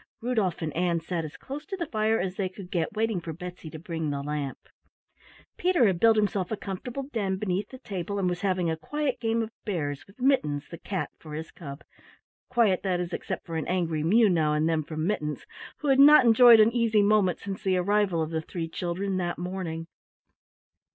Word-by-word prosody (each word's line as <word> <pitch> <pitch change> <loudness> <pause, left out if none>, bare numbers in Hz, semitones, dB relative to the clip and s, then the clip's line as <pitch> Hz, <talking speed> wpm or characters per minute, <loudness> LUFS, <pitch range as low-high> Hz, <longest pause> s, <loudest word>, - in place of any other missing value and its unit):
Rudolf 220 -9 -1
and 155 -2 -4
Ann 170 0 +1
sat 165 0 -3
as 155 -1 -8
close 285 +3 -7
to 390 - -4
the 340 - -2
fire 220 -3 +1
as 185 0 -2
they 190 -1 -1
could 185 0 -11
get, 170 0 -1
waiting 220 -4 0
for 165 -1 -6
Betsy 175 0 -8
to 160 - -8
bring 160 -1 -4
the 140 -1 -3
lamp. 145 -2 -3 1.0
Peter 355 -8 +3
had 190 -5 +2
built 225 +2 +6
himself 200 -3 0
a 220 - -2
comfortable 235 +8 -5
den 195 -4 -1
beneath 190 0 -2
the 260 - -10
table 200 -3 -5
and 190 -2 +1
was 180 0 -2
having 185 -3 +1
a 160 - 0
quiet 285 - -2
game 225 0 0
of 220 - -6
Bears 145 -9 -3
with 195 +5 -20
Mittens, 155 - +1
the 170 - -8
cat, 190 -2 -3
for 155 -2 -9
his 160 +1 -6
cub 140 -3 -9 0.7
quiet, 230 -7 +3
that 185 -2 0
is, 175 0 -4
except - - -4
for 165 -2 -4
an 160 - -3
angry 170 -4 0
mew 215 +8 +5
now 160 -5 +2
and 155 +1 +1
then 160 -1 +1
from 155 +1 -4
Mittens, 150 -7 -2 0.4
who 295 - -1
had 270 0 +4
not 290 -1 +8
enjoyed 235 0 +8
an 215 +1 +6
easy 225 -3 +3
moment 200 -4 +3
since 195 -1 -6
the 190 -1 +1
arrival 190 -2 +2
of 155 - -5
the 160 -1 -1
three 165 +1 -5
children 185 +3 -3
that 175 -1 -2
morning. 175 -2 -4
185 Hz, 210 wpm, -27 LUFS, 165-215 Hz, 1.0 s, not